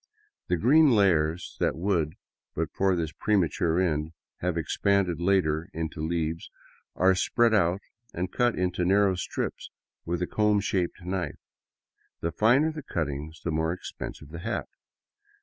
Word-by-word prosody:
The 90 - +1
green 145 - +5
layers 85 -7 +2
that - - +1
would, 85 -3 0 0.4
but - - -2
for 95 -1 +2
this 80 -3 -2
premature 85 -4 +1
end, 80 -3 0 0.2
have 90 -1 -2
expanded 90 +1 +1
later 85 -4 +1
into 80 -1 -4
leaves, 80 0 -2 0.5
are 95 +1 +4
spread 115 +5 +2
out 95 -2 +2 0.3
and 90 +2 -3
cut 120 -1 +2
into 90 -1 0
narrow 100 +2 +4
strips 90 - -4 0.3
with 85 +1 -2
a - - +1
comb 105 +2 +2
shaped 95 -2 -2
knife. 90 0 -3 0.8
The 85 - -2
finer 125 - +3
the 155 -1 -7
cut 85 - -2
ting, 70 +2 -5
the 85 - -1
more 80 +1 0
expensive 80 -4 -8
the 85 +1 -8
hat. 110 +7 -3
90 Hz, 150 wpm, -27 LUFS, 80-100 Hz, 0.8 s, green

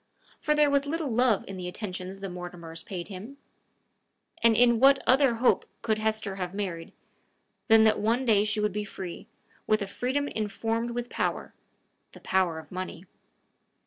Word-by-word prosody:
For 300 - +1
there 300 -1 +4
was 280 0 +2
little 315 -2 -2
love 235 -2 +2
in 195 - -7
the 180 -1 -5
attentions 185 0 -6
the 195 - -3
Mortimers 175 -2 -8
paid 175 -1 -6
him; 210 +8 -9 1.0
and 230 -1 +5
in 235 -1 +5
what 275 +2 +7
other 260 -2 +4
hope 240 +2 +2 0.2
could 220 -2 +1
Hesper 215 -2 -1
have 180 0 -4
married, 180 -5 -4 0.8
than 225 -1 +7
that 220 -1 +4
one 230 +5 +1
day 210 -4 +4
she 210 0 -1
would 210 -2 0
be 210 0 -2
free, 185 -3 -8 0.4
with 215 -1 +2
a - - -3
freedom 260 +8 -2
informed 225 +2 -2
with 240 0 -4
power, - - -2 0.6
the - - -12
power 185 -4 +1
of 160 - -10
money! 185 -1 -6
215 Hz, 170 wpm, -28 LUFS, 185-240 Hz, 1.0 s, what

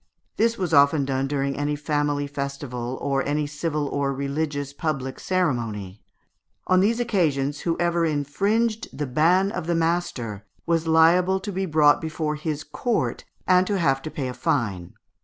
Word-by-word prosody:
This 230 +1 +2
was 180 -5 -2
often 140 0 +5
done 135 0 -1
during 140 -1 -1
any 145 +1 -1
family 145 -1 -1
festival, 140 -3 -4
or 140 -1 +1
any 150 +1 0
civil 145 0 -2
or 140 -1 -1
religious 140 +1 -3
public 135 -5 -3
ceremony. 115 - -2 0.6
On 185 0 +4
these 225 +5 +2
occasions, 150 - 0
whoever 170 0 0
infringed 200 +10 0
the 145 - -3
ban 175 +9 +3
of 160 - -4
the 170 - +1
master, 165 - -1 0.2
was 165 -1 0
liable 175 +4 +4
to 205 - -5
be 190 0 -2
brought 150 -2 +4
before 160 -1 -2
his 150 -1 -3
court, 230 - -2 0.2
and 185 0 +4
to 205 - 0
have 135 -6 +2
to 155 - -5
pay 140 -4 -4
a 125 - -4
fine. 100 -11 -1
150 Hz, 160 wpm, -24 LUFS, 140-175 Hz, 0.6 s, often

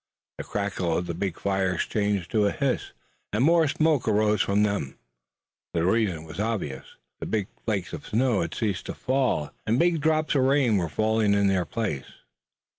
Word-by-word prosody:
The - - -3
crackle 95 -5 -1
of 90 - -2
the 85 - -3
big 90 0 -3
fires 95 -2 0
changed 100 -4 -1
to 105 -2 +3
a - - +1
hiss, 140 -4 -1 0.4
and 105 +4 +1
more 165 +1 +5
smoke 155 -3 +1
arose 105 -1 +3
from 100 +1 +2
them. 100 -11 -1 0.8
The 85 0 +1
reason 95 -5 +1
was 80 +3 -9
obvious. 105 -12 -3 0.2
The - - -5
big 105 -3 -1 0.2
flakes 100 -5 -2
of - - -7
snow 115 -1 +2
had 85 - -3
ceased 105 -5 -2
to - - -5
fall, 130 - 0 0.2
and 115 - +2
big 170 0 +2
drops 155 0 +2
of 140 - +3
rain 130 -5 +3
were 85 -3 -1
falling 110 +2 +2
in 100 0 +3
their 95 -2 +1
place. 85 - -3
105 Hz, 185 wpm, -26 LUFS, 95-125 Hz, 0.8 s, more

